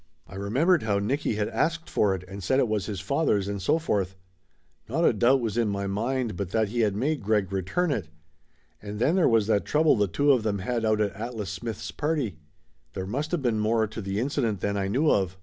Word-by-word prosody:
I - - -15
remembered 130 - +2
how 105 -2 0
Nicky 115 +4 -1
had 105 0 0
asked 165 +7 -1
for 100 -2 +2
it 90 - -7
and 100 +1 -8
said 130 +10 +2
it 130 - +3
was 105 -3 -1
his 100 -4 -4
father's 105 - +1
and 100 -1 -3
so 150 - +2
forth. 100 - -1 0.7
Not 160 +8 +1
a - - +5
doubt 125 +5 +3
was 115 0 -1
in 115 - +2
my 100 0 -2
mind 115 +3 -1
but 95 0 -4
that 110 +1 +1
he 120 +3 -3
had 105 -4 +2
made 145 +6 0
Greg 105 -2 0
re 95 - 0
turn 170 - 0
it. 100 - -2 0.7
And 105 0 -6
then 140 - +2
there 185 - +4
was 115 -3 +3
that 105 -1 +2
trouble 155 +1 +3
the 105 -3 +2
two 145 +10 +2
of 130 -4 +3
them 105 -2 -1
had 115 +4 -2
out 110 -1 +2
at 100 -2 0
Atlas 110 -2 -5
Smith's 105 +3 -5
party. 145 - -2 0.5
There 95 -1 -4
must 140 +10 -3
of 170 -6 -1
been 115 -4 +1
more 110 +1 +2
to 110 +1 -7
the 100 +1 -2
incident 120 -5 -1
than 100 +2 -1
I 100 -1 -1
knew 140 +10 +2
of. 95 -2 0
110 Hz, 235 wpm, -26 LUFS, 100-130 Hz, 0.7 s, a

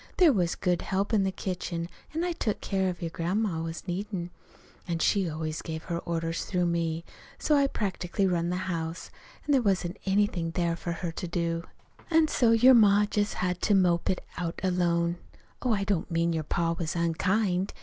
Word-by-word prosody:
There 345 -6 +6
was 175 -6 +1
good 180 -2 0
help 195 +4 -1
in 210 - +4
the 190 - 0
kitchen, 175 -3 -4 0.2
an' 325 +2 -2
I 355 - 0
took 225 -11 -1
what - - -32
care 190 -2 0
of 175 -1 -5
your 165 - -3
grandma 175 +1 -1
was 165 +3 -6
needed; 180 -1 -3 0.6
an' 170 -1 -1
she 185 +2 +2
always 155 0 -3
gave 160 -1 -5
her 170 0 -3
orders 165 -1 -2
through 180 -2 0
me, 170 -1 -1 0.3
so 300 - +2
I 280 -1 +4
practically 195 -5 -1
run 175 -2 +1
the 180 - -1
house, 165 -1 -4 0.3
an' 295 - 0
there 270 -3 +5
wasn't 190 -5 0
anything 190 -4 +1
there 170 -1 +1
for 170 0 -4
her 170 0 -4
to 180 +2 -5
do. 170 0 -1 0.4
"An' 320 -2 +4
so 240 -5 +3
your 245 +3 +7
ma 210 -3 +6
just 205 0 -1
had 180 -1 -1
to 205 - +3
mope 175 -3 +3
it 185 - -1
out 170 -2 -3
alone. 175 -2 +1 0.4
Oh, 250 - 0
I 200 -2 0
don't 195 -4 -1
mean 170 0 +1
your 160 -2 -2
pa 165 +2 0
was 165 -1 -3
unkind. 185 +3 +1
180 Hz, 200 wpm, -28 LUFS, 170-200 Hz, 0.6 s, your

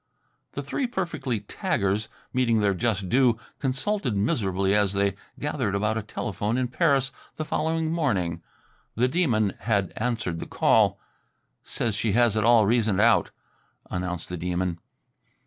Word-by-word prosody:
The - - -4
three 265 - -2
perfectly 170 - -2
taggers 100 +2 -1 0.3
meeting 120 -3 +2
their 100 -1 +2
just 100 -1 -1
due, 125 +1 +3 0.2
consulted 135 - -1
miserably 100 -2 +1
as 105 -2 +2
they 100 -1 +1 0.3
gathered 130 -9 -1
about 105 +2 0
a 115 - -1
telephone 105 +1 -3
in 130 -1 0
Paris 135 +1 +2 0.2
the 155 - -4
following 160 +1 -1
morning. 95 - 0 0.5
The 125 +3 +3
Demon 125 - +1
had 100 -5 0
answered 110 -8 -2
the - - -6
call. - - +3 0.6
"Says 115 -2 -2
she 105 0 0
has 120 -1 +3
it 110 - +1
all 115 -1 +6
reasoned 110 -2 +2
out," 115 +3 +4 0.6
announced 90 -2 -3
the 90 - -5
Demon. 90 0 -2
110 Hz, 145 wpm, -26 LUFS, 100-130 Hz, 0.6 s, all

